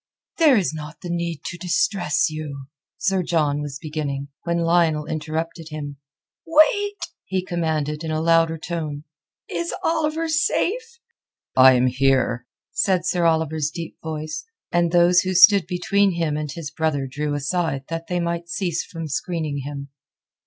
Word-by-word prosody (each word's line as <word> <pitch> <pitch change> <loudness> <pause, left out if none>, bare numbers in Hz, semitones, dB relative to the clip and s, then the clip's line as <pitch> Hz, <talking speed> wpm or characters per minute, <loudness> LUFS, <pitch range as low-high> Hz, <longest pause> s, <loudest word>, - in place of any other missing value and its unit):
"There 300 -6 +6
is 185 -6 0
not 150 0 -8
the 175 - -5
need 170 -2 -3
to 175 - -5
distress 180 -2 +1
you...." 150 -3 -6 0.3
Sir 190 -1 +1
John 150 -4 +1
was 145 -2 -5
beginning, 145 -3 -4 0.2
when 170 0 0
Lionel 165 -2 +2
interrupted 160 +1 -4
him. 145 -2 -6 0.5
"Wait!" 405 +6 +3 0.3
he 185 -1 -2
commanded 155 -3 -1
in 160 - -3
a 155 0 0
louder 165 0 +3
tone. 155 -3 -4 0.4
"Is 170 0 -3
Oliver 320 0 0
safe?" 450 +9 0 0.6
"I 130 0 +8
am 125 0 +3
here," 125 -1 +1 0.2
said 185 -3 +1
Sir 180 -1 +1
Oliver's 160 -2 +1
deep 165 0 -7
voice, 155 -1 -4 0.3
and 175 -1 +2
those 175 +1 +5
who 185 0 -1
stood 195 0 +7
between 195 +2 +2
him 165 -3 -1
and 150 -1 -3
his 155 -1 -6
brother 155 -3 -1
drew 145 +2 -3
aside 145 -1 -1
that 165 0 -4
they 180 -1 -1
might 170 0 -2
cease 175 -3 -1
from 165 -2 -7
screening 155 -1 -2
him. 140 0 -6
165 Hz, 150 wpm, -23 LUFS, 150-175 Hz, 0.6 s, I